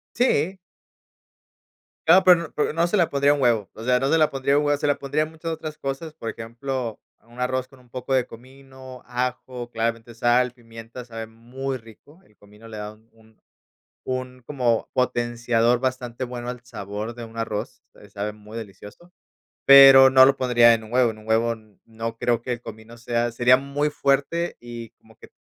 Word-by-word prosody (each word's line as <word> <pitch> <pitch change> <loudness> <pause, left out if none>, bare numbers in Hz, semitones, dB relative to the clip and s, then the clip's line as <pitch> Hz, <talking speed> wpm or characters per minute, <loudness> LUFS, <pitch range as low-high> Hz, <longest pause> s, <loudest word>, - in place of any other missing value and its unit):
Sí. 190 - +1 1.5
Claro, 180 +4 +6
pero, 180 -2 +7
n - - -20
pero, 150 - 0
no, 165 +2 +1
se 175 - 0
la 175 -4 +2
pondría 140 +1 +3
un 145 - -3
huevo, 115 -6 +2
o 110 - -9
sea, 125 +1 +3
no, 135 - 0
se - - +4
la 155 -1 +3
pondría 135 +1 0
un 150 - 0
huevo, 145 0 +1
se 150 - -1
la 145 - +2
pondría 145 +2 -1
a - - -7
muchas 160 +1 -6
otras 155 -1 -6
cosas, 135 +3 -5
por 115 - -5
ejemplo, 115 +1 -5 0.2
a - - -32
un 120 +1 -17
arroz 130 0 -1
con 135 -1 -19
un 125 -1 -24
poco 130 +1 -3
de 130 -2 +2
comino, 130 +1 -13
ajo, 125 0 -4
claramente 115 0 -3
sal, 120 +2 +2
pimienta 115 0 -11
sabe 115 -2 -7
muy 125 +4 -6
rico, 125 - -17
el 105 - -27
comino 105 +2 -18
le 110 -1 -8
da 105 0 -6
un 110 +1 -27
un 110 -1 -25 0.6
un 130 0 -5
como 125 -5 0
potenciador 120 -1 +1
bastante 130 -1 -3
bueno 120 -1 -6
al 125 -1 -7
sabor 105 -1 -6
de 120 0 -9
un 115 0 -13
arroz, 115 0 -4
se 105 - -17
sabe 100 +1 -4
muy 105 +1 -11
delicioso, 105 - -11 0.6
pero, 135 -1 +10
no 130 0 +8
lo 135 +1 +4
pondría 120 -3 +5
en 110 -1 -4
un 110 - -13
huevo, 125 -1 +3
en 110 - -10
un 110 - -15
huevo, 115 +1 +2
n 110 -2 -21
no 115 0 -6
creo, 120 0 0
que 125 - -3
el 120 - -4
comino 110 0 -11
sea 120 0 -2
sería 125 +2 +5
muy 140 +2 -2
fuerte 145 +5 0
y 120 -2 -9
como - - -24
que - - -15
125 Hz, 205 wpm, -23 LUFS, 115-135 Hz, 1.5 s, pero